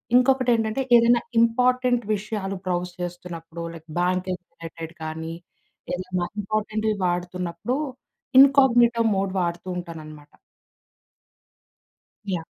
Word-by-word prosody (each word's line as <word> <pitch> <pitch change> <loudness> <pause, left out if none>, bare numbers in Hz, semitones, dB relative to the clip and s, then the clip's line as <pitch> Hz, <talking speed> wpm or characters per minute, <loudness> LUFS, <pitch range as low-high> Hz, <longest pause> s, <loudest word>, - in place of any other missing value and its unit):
ఇంకొకటేంటంటే 250 -2 +3
ఏదైనా 235 0 +5 0.2
ఇంపార్టెంట్ 250 +1 +3
విషయాలు 200 -1 -4
బ్రౌజ్ 180 0 -1
చేస్తున్నప్పుడు 170 -2 -7
లైక్ 165 0 -12
బ్యాంకింగ్ 180 0 -1
రిలేటెడ్ 165 -1 -8
కానీ 160 +1 -5 0.6
ఏదైనా 185 -1 -2 0.2
ఇంపార్టెంట్‌వి 215 +1 -1
వాడుతున్నప్పుడు 180 +6 -2 0.6
ఇన్‌కాగ్‌నిటో 240 -4 +6
మోడ్ 195 -1 0
వాడుతూ 175 +1 -3
ఉంటాననమాట. 155 -4 -9 2.0
యాహ్! 170 -3 -2
185 Hz, 85 wpm, -24 LUFS, 170-235 Hz, 2.0 s, ఇన్‌కాగ్‌నిటో